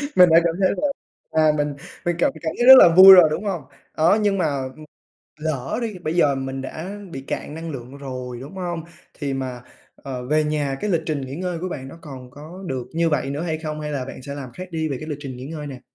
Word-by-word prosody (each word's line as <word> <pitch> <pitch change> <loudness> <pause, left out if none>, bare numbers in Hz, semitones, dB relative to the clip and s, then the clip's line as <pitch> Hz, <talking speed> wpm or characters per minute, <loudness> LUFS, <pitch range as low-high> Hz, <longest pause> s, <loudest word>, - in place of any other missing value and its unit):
Mình 180 -1 +7
đã 165 +1 +7
cảm 165 -1 +1
thấy 190 - +4
là, 295 - +2 0.4
à, 155 -1 +4
mình 145 0 -1 0.3
mình 175 0 +1
cảm - - +3
cảm 160 - -2
thấy 240 - +2
rất 265 0 +12
là 175 - +9
vui 190 +1 +11
rồi, 180 -3 +8
đúng 165 +7 -3
hông? 200 - -2 0.4
Đó, 165 +6 +4
nhưng 205 -1 +1
mà, 180 - +1 0.3
ừm, 155 - -12 0.5
lỡ 145 -4 -3
đi, 215 -5 -4
bây 160 -2 -3
giờ 145 -5 +3
mình 135 0 -4
đã 180 +9 -7
bị 135 - -6
cạn 140 - -5
năng 165 +1 -6
lượng 130 0 -8
rồi, 125 -3 -6
đúng 140 +7 -10
hông? 175 -3 -4 0.4
Thì 140 -2 -2
mà, 130 -2 -4 0.3
ờ, 125 -2 -7
về 155 +4 +2
nhà, 150 -3 -1
cái 210 - -1
lịch 170 -4 +1
trình 150 -3 -2
nghỉ 135 +1 -6
ngơi 180 0 -3
của 185 +2 -4
bạn 135 -6 -6
nó 150 - -11
còn 130 -5 -10
có 160 +8 -11
được 130 -3 -4
như 165 0 +1
vậy 140 -3 -1
nữa 140 +2 -3
hay 160 -2 -2
không, 155 -1 -5
hay 150 0 -4
là 135 -3 -3
bạn 135 - -9
sẽ 140 +2 -7
làm 135 -3 -7
khác 185 +8 -8
đi 160 -1 -2
về 135 - -3
cái 155 - -7
lịch 145 - -3
trình 130 -3 -7
nghỉ 125 - -8
ngơi 150 0 -6
nè? 130 -3 -9
155 Hz, 260 wpm, -22 LUFS, 135-170 Hz, 0.5 s, rất